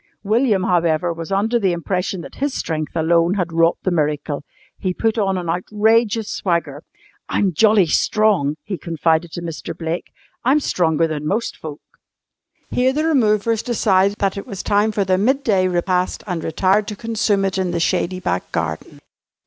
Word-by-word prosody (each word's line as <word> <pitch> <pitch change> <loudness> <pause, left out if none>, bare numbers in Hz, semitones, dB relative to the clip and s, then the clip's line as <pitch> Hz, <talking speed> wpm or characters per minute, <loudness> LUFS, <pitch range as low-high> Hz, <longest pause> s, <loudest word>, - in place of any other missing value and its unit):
William, 215 -2 +2
however, 170 -1 +1
was 165 +2 -7
under 220 +5 +1
the 190 -5 +1
impression 180 +2 -2
that - - -10
his 285 -1 0
strength 155 -1 -3
alone 170 +2 +2
had 175 -4 -2
wrought 165 +1 +3
the 185 - 0
miracle. 150 -2 -1 0.4
He 185 -2 -2
put 225 0 0
on 195 -2 +1
an 175 -2 -4
outrageous 215 +5 +1
swagger. 165 -5 -2 0.5
"I'm 195 -3 +1
jolly 210 +2 +4
strong," 175 -3 +2
he 190 -5 -5
confided 165 0 0
to 175 - -5
Mr. 165 -3 -6
Blake. 165 +1 -4 0.3
"I'm 270 +5 +4
stronger 165 - +1
than 150 -2 -3
most 220 +7 -1
folk." 155 -2 -8 0.9
Here 255 +1 +2
the 305 +3 0
removers 225 -7 +2
decided 200 -4 +2
that 195 0 0
it 200 - -6
was 195 -2 -6
time 205 +2 +2
for 205 -1 0
their 185 0 +2
midday 220 -5 +2
repast 180 0 0
and 180 -5 -3
retired 190 +6 +1
to 210 - -4
consume 220 -3 0
it 190 0 -1
in 185 -1 0
the 175 -1 -1
shady 185 +2 0
back 90 - -2
garden. 80 -1 -4
185 Hz, 170 wpm, -20 LUFS, 165-215 Hz, 0.9 s, jolly